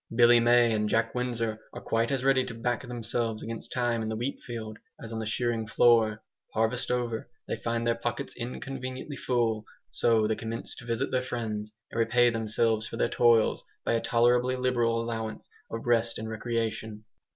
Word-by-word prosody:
Billy 120 Hz, 0 st, +7 dB
May 120 Hz, 0 st, +5 dB
and 105 Hz, -1 st, 0 dB
Jack 115 Hz, +1 st, +1 dB
Windsor 115 Hz, -3 st, -2 dB
are -, -, -6 dB
quite 115 Hz, +1 st, 0 dB
as 135 Hz, -2 st, 0 dB
ready 135 Hz, -1 st, +4 dB
to 115 Hz, -, -6 dB
back 120 Hz, +1 st, -1 dB
themselves 115 Hz, -2 st, -2 dB
against 115 Hz, 0 st, -5 dB
time 120 Hz, -2 st, 0 dB
in 110 Hz, -, -2 dB
the 110 Hz, -, -2 dB
wheat 120 Hz, +5 st, -3 dB
field 110 Hz, -3 st, -7 dB, 0.2 s
as 115 Hz, 0 st, -8 dB
on 110 Hz, -, -3 dB
the 110 Hz, -, -3 dB
shearing 115 Hz, -1 st, 0 dB
floor. 110 Hz, -2 st, +4 dB, 0.3 s
Harvest 115 Hz, +3 st, 0 dB
over, 120 Hz, -2 st, -1 dB, 0.2 s
they -, -, -1 dB
find 115 Hz, 0 st, -2 dB
their 120 Hz, -, +3 dB
pockets 115 Hz, +1 st, -4 dB
inconveniently 130 Hz, +3 st, -5 dB
full, 115 Hz, -5 st, 0 dB, 0.3 s
so 115 Hz, -2 st, +3 dB
they 110 Hz, -, +1 dB
commence 115 Hz, +1 st, -5 dB
to 130 Hz, -, -10 dB
visit 115 Hz, +3 st, -1 dB
their 130 Hz, -, +2 dB
friends 110 Hz, -4 st, -4 dB, 0.2 s
and 115 Hz, -, -3 dB
repay 120 Hz, +1 st, +4 dB
themselves 110 Hz, 0 st, +1 dB
for 115 Hz, -, -6 dB
their -, -, +1 dB
toils 115 Hz, -2 st, +4 dB, 0.2 s
by -, -, +2 dB
a 115 Hz, -, +1 dB
tolerably 120 Hz, +2 st, +3 dB
liberal 120 Hz, -2 st, +1 dB
allowance 115 Hz, -1 st, -4 dB, 0.2 s
of 115 Hz, -, -5 dB
rest 115 Hz, -1 st, +2 dB
and 110 Hz, -, -5 dB
recreation. 110 Hz, -1 st, -3 dB
115 Hz, 185 wpm, -28 LUFS, 110-120 Hz, 0.3 s, Billy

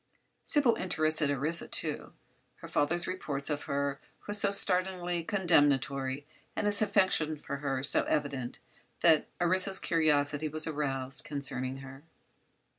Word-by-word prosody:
Sybil 280 Hz, -6 st, +3 dB
interested 155 Hz, -4 st, +1 dB
Orissa, 145 Hz, +5 st, -1 dB
too. -, -, -3 dB, 0.4 s
Her -, -, -11 dB
father's 170 Hz, +4 st, +1 dB
reports 150 Hz, -6 st, -3 dB
of 145 Hz, 0 st, -3 dB
her 140 Hz, 0 st, -2 dB, 0.2 s
were 205 Hz, -, -4 dB
so 205 Hz, -1 st, +3 dB
startlingly 180 Hz, -3 st, +1 dB
condemnatory, 145 Hz, -7 st, +1 dB, 0.3 s
and -, -, -1 dB
his 205 Hz, 0 st, +1 dB
affection 185 Hz, -7 st, +2 dB
for 140 Hz, -1 st, -5 dB
her 135 Hz, -2 st, -2 dB
so 140 Hz, -, +4 dB
evident, 140 Hz, -4 st, -2 dB, 0.4 s
that 160 Hz, -3 st, +4 dB
Orissa's 185 Hz, +2 st, +3 dB
curiosity 150 Hz, -3 st, +1 dB
was 155 Hz, +1 st, -1 dB
aroused 135 Hz, -4 st, -3 dB
concerning 130 Hz, -2 st, -4 dB
her. 135 Hz, +1 st, -11 dB
150 Hz, 125 wpm, -30 LUFS, 140-180 Hz, 0.4 s, so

